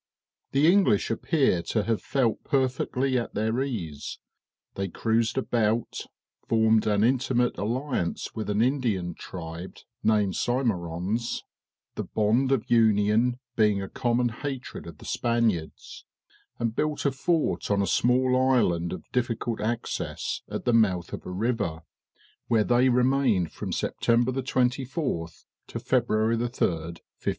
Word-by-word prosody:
The 140 +2 +3
English 175 - +4
appear 130 - +1
to 105 +5 -1
have 115 0 0
felt 125 -5 0
perfectly 130 -1 0
at 115 - -6
their 110 +4 0
ease; 90 - -4 0.6
they 95 0 -2
cruised 115 +6 0
about, 115 -3 0 0.4
formed 110 -1 +3
an 105 0 +2
intimate 125 0 +2
alliance 120 -3 -2
with 110 -2 -4
an 105 +2 +2
Indian 115 -10 0
tribe, 85 +1 -8 0.2
named 105 -3 +2
Symerons, 110 -3 -1 0.5
the - - -3
bond 115 +6 +1
of 130 -5 +1
union 110 +1 +3 0.2
being 105 -3 +3
a 95 - -4
common 120 +2 0
hatred 130 +2 -6
of - - -10
the - - -13
Spaniards, 115 -9 -1 0.5
and 115 -1 -2
built 150 +1 -1
a 140 - +3
fort 160 +5 0
on 100 -1 +2
a - - +1
small 125 +7 +2
island 120 -10 +2
of 90 - -7
difficult 120 -2 -1
access, 115 +2 -3
at - - -5
the 120 - +2
mouth 95 -6 +2
of - - -6
a - - -5
river, 90 -6 -1 0.6
where 115 -3 +3
they 125 +3 +3
remained 125 - +2
from - - -6
September 120 +2 +1
24 130 - -1 0.4
to - - -5
February 110 +2 +1
3, - - -2
1573. 85 -9 -1
115 Hz, 135 wpm, -26 LUFS, 105-125 Hz, 0.6 s, English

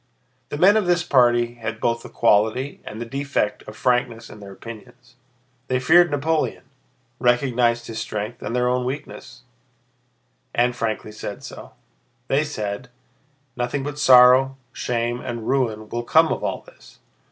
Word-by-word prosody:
The - - -4
men 195 +7 +5
of 210 -4 0
this 175 0 +2
party 120 -4 +3
had 115 0 -4
both 115 0 0
the - - -11
quality 115 +5 +1
and 110 - -8
the 120 - -4
defect 135 -4 -2
of 105 0 -10
frankness 120 -2 0
in 105 - -12
their 100 -1 -11
opinions. 115 +4 -12 0.5
They 130 0 0
feared 175 +7 +5
Napoleon, 150 +2 -1 0.6
recognized 120 -1 +2
his 110 -1 -6
strength 105 +3 -5
and 120 - -4
their 125 0 +1
own 125 0 +1
weakness, 125 -2 -7 1.1
and 120 +1 +2
frankly 110 -2 -3
said 105 -1 -7
so. - - -10 0.6
They 140 +3 +2
said: 110 -4 -5 0.7
"Nothing 125 +3 -2
but 145 +1 -5
sorrow, 130 0 +6 0.2
shame, 120 0 -2
and 115 -2 -6
ruin 115 -5 0
will 120 +2 -3
come 160 +6 +4
of - - -6
all - - -2
this! - - -19
120 Hz, 150 wpm, -22 LUFS, 115-135 Hz, 1.1 s, sorrow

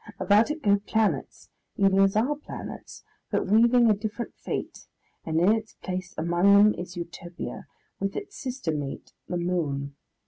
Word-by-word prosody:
About 210 +4 +4
it 300 0 -4
go 200 0 +4
planets, 215 +1 -1 0.3
even 195 -1 +4
as 195 0 +4
our 250 +7 +2
planets, 295 - -9 0.3
but - - 0
weaving 235 +4 +5
a 215 - +6
different 215 +3 -5
fate, - - -5 0.4
and 160 0 +1
in 180 +5 +5
its 220 -1 -4
place 185 +1 -5
among 175 +5 +4
them 210 +1 +6
is 175 0 -7
Utopia, 170 0 -7 0.3
with 195 0 -2
its 405 0 -6
sister 255 - -3
mate, 145 -2 -5
the 180 - -2
Moon. 150 -6 -2
200 Hz, 160 wpm, -26 LUFS, 175-220 Hz, 0.4 s, a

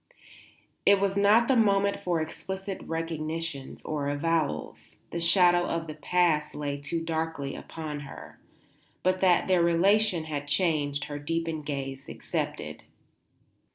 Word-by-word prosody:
It 200 -1 +6
was 195 0 +1
not 210 +4 +5
the 265 - +4
moment 200 -3 +3
for 175 -2 0
explicit 190 +4 -5
recognitions 165 -3 -4
or 145 -2 -2
avowals; 150 - -2 0.2
the 170 - -2
shadow 175 0 +4
of 165 0 -2
the 155 - -6
past 155 -1 +1
lay 145 -1 -3
too 165 +3 -2
darkly 160 -4 -2
upon 155 -2 -6
her. 145 - -10 0.6
But 185 0 +1
that 180 -2 +4
their 185 -2 +4
relation 180 +2 +3
had 145 -2 -4
changed 145 -2 +1
her 145 0 -5
deepened 165 0 -3
gaze 135 -2 -4
accepted. - - -4
165 Hz, 130 wpm, -28 LUFS, 150-185 Hz, 0.6 s, It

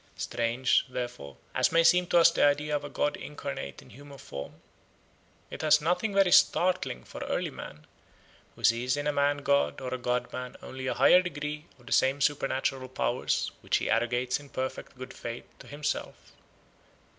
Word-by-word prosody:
Strange, 120 +2 +1
therefore, 120 - -6 0.2
as - - +2
may 165 0 +4
seem 180 +1 +5
to 175 - +3
us 170 0 +7
the - - +1
idea 150 +1 +2
of 145 - -2
a 145 - -6
god 145 - 0
incarnate 140 - -6
in - - -18
human 140 +4 -12
form, 70 - -8 1.0
it - - -6
has 155 -1 +5
nothing 180 +7 0
very 195 -2 +3
startling 180 - +3
for - - -10
early - - -2
man, 75 0 -10 0.7
who - - -15
sees 125 +3 +2
in 145 - -3
a 150 - +1
man 145 0 +1
god 140 0 +2
or 130 -1 -5
a 130 - -3
god 125 0 -2
man 125 0 -6
only 130 0 -6
a - - -1
higher 140 +8 +6
degree 150 -3 -5
of 125 - -21
the 135 - -11
same 135 +2 +3
supernatural 135 -2 0
powers - - -1
which - - +1
he - - -2
arrogates 120 +3 +1
in 145 -1 -14
perfect 130 0 -5
good 130 0 -8
faith 120 0 -7
to - - -13
himself. 145 +1 -4
140 Hz, 180 wpm, -28 LUFS, 125-150 Hz, 1.0 s, us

